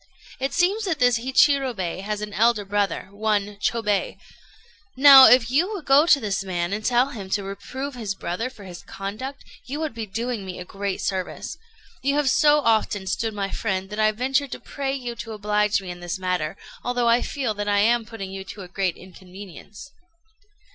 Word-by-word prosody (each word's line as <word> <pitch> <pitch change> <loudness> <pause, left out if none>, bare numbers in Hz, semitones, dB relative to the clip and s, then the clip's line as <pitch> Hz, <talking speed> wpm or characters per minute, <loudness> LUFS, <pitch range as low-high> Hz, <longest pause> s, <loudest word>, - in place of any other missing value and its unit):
It 270 +1 -1
seems 390 +5 +1
that 350 -5 -1
this 245 -3 +3
Hichirobei 255 - +1
has 210 +1 -4
an 210 -1 -6
elder 220 -1 +2
brother 200 -1 -1
one 205 -1 -1
Chôbei; 210 -1 -1 0.8
now, 270 -1 +10
if 245 0 +5
you 340 +10 +2
would 390 -7 -6
go 280 +4 +5
to 295 - +6
this 200 -4 -2
man 175 -1 -2
and 215 +1 -3
tell 245 +3 +2
him 200 -6 -8
to 200 +1 -1
reprove 260 +8 -6
his 215 -5 -4
brother 195 +7 -3
for 215 -6 -14
his 180 -2 -10
conduct, 215 +8 -7 0.2
you 280 +4 -4
would 315 -4 -3
be 225 -1 -5
doing 230 +2 -3
me 185 -1 -7
a 180 - -7
great 195 +1 -4
service. 190 -2 -3 0.5
You 280 +1 +1
have 290 -3 +2
so 300 -1 +4
often 220 -5 +1
stood 220 +3 -2
my 200 -1 -3
friend, 190 -2 -3
that 210 - -5
I 215 0 +4
venture 260 +5 0
to 265 - -7
pray 275 -1 -4
you 245 -3 -5
to 225 - -6
oblige 210 0 +1
me 180 - -6
in 175 - -9
this 175 +1 -4
matter, 180 -4 -2 0.3
although 245 -1 0
I 235 +1 +4
feel 260 -6 -2
that 205 0 -4
I 205 0 +2
am 235 +2 +3
putting 215 -4 -8
you 195 0 -6
to 195 -1 -9
great 185 -2 -1
inconvenience." 190 - -12
215 Hz, 195 wpm, -23 LUFS, 195-260 Hz, 0.8 s, now